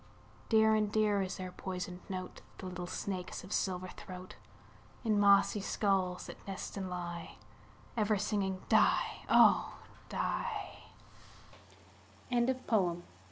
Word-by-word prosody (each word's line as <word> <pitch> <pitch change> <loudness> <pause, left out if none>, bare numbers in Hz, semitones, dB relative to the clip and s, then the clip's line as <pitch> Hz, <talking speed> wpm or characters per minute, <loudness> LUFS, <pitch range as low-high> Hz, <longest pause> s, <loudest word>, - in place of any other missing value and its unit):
Dear 220 -1 +5
and 210 -1 +2
dear 210 -2 +3
is 190 0 -3
their 185 -1 -5
poisoned 180 -1 -5
note, 185 -1 -5 0.2
The - - -8
little 180 -1 -5
snakes' 185 0 -4
of 185 - -6
silver 185 -1 -1
throat, 185 -2 -9 0.7
In 215 -3 +2
mossy 200 +1 +5
skulls 190 -3 0
that - - -8
nest 195 -1 -5
and 190 -2 -3
lie, 175 -1 -5 0.6
Ever 215 -2 +2
singing 195 -2 -1
"die, - - +3
oh! - - +6
190 Hz, 110 wpm, -33 LUFS, 180-205 Hz, 0.7 s, oh